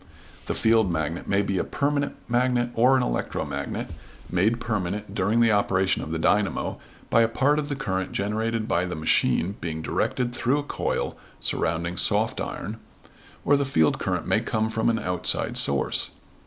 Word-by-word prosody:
The - - -1
field 110 -4 +3
magnet 80 +1 -2
may 100 +1 +2
be 100 -2 -1
a - - +1
permanent 145 0 -1
magnet 120 0 +1
or 125 +3 +4
an 130 - +1
electromagnet, - - -3 0.4
made 105 +7 +2
permanent 105 -2 -3
during 105 +5 +2
the 115 -1 +5
operation 95 -2 +2
of - - -6
the 80 - -2
dynamo 100 +4 +1 0.3
by 115 - +5
a 115 - +4
part 140 +6 +2
of 145 -1 -3
the 140 - -1
current 95 -9 -2
generated 110 +2 -1
by 85 -3 +1
the 90 - -4
machine 80 +4 +1
being 80 -1 -4
directed 120 +7 -1
through 130 +3 +1
a 145 - -2
coil - - -2 0.2
surrounding 85 +2 -1
soft - - +1
iron; - - -5 0.7
or 145 - +5
the 140 - +2
field 105 - +2
current - - -1
may - - +2
come 110 0 -1
from 110 +1 +1
an 115 - +1
outside 90 -5 0
source. 70 -1 +1
110 Hz, 170 wpm, -25 LUFS, 90-120 Hz, 0.7 s, the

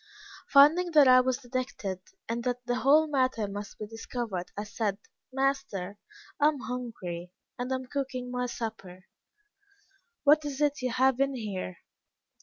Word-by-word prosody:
Finding 310 +6 +6
that 295 -3 +7
I 255 0 +8
was 255 0 0
detected, 245 -7 -4 0.3
and 235 +1 -2
that 245 0 -2
the 245 0 0
whole 295 +5 +5
matter 255 -7 0
must 205 +1 -7
be 215 - -5
discovered, 225 -4 -5
I 205 - -2
said, 210 -1 -2 0.3
'Master, 235 -8 -1 0.4
I 295 - +5
am 300 -2 +1
hungry, 185 -9 -5 0.3
and 250 +1 -3
am 260 0 -2
cooking 255 -2 -4
my 250 0 -1
supper.' 195 -6 -6 1.2
'What 305 +1 +5
is 285 -2 -4
it 290 -2 +1
you 255 - 0
have 260 +1 +2
in 275 0 +1
here?' 195 - -5
250 Hz, 150 wpm, -29 LUFS, 210-270 Hz, 1.2 s, I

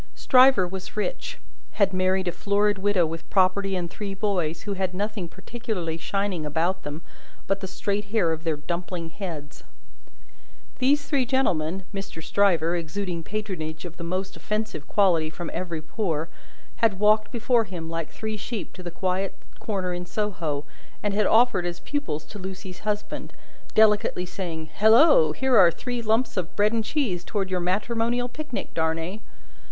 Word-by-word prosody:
Stryver 255 -7 +6
was 190 +3 -7
rich; - - -2 0.4
had 195 -2 +2
married 185 0 +1
a - - +2
florid 205 +2 +1
widow 195 -3 +3
with 165 +1 -6
property 195 +1 +3
and 175 -2 -1
three 200 +2 -5
boys, 180 -6 -1
who 205 - -2
had 185 -1 -2
nothing 205 -2 -2
particularly 190 -3 -4
shining 195 0 -1
about 165 +5 0
them 145 +3 -6 0.4
but 195 0 0
the 190 - -5
straight 205 +2 -2
hair 200 -5 +2
of 160 0 -3
their 160 -3 0
dumpling 170 +1 -4
heads. 160 -7 -7 1.2
These 285 +3 +3
three 280 -1 +1
young 255 - +1
gentlemen, 190 - +1
Mr. 195 -5 -6
Stryver, 175 -4 +3
exuding 175 +1 -3
patronage 180 -5 -4
of 175 -1 -8
the 170 - -6
most 185 +3 -3
offensive 215 -8 -3
quality 175 -6 +3
from 170 +2 -6
every 170 -4 -3
pore, 165 -5 -2 0.5
had 220 -4 +3
walked 210 0 +4
before 235 0 +2
him 175 -4 -6
like 165 -1 -3
three 220 -1 -4
sheep 215 +1 -5
to 185 - -9
the 175 - -5
quiet 185 +2 -1 0.2
corner 190 -4 -2
in 175 0 -5
Soho, 170 -10 -2 0.4
and 205 -1 +1
had 210 +1 +3
offered 225 -6 +4
as 175 0 -4
pupils 285 - -3
to 210 - -10
Lucie's 190 -1 -7
husband: 210 0 -3 0.4
delicately 210 -4 +4
saying 170 -3 -5
"Halloa! 220 - +6
here 265 -3 +3
are 175 - +8
three 245 +8 -4
lumps 225 +1 +1
of 180 -3 -2
bread 210 +2 +3
and 225 -1 +1
cheese 215 - -1
towards 195 -2 -2
your 180 - +1
matrimonial 230 +6 0
picnic, 295 -1 -6
Darnay!" 165 +5 -1
190 Hz, 165 wpm, -26 LUFS, 170-215 Hz, 1.2 s, are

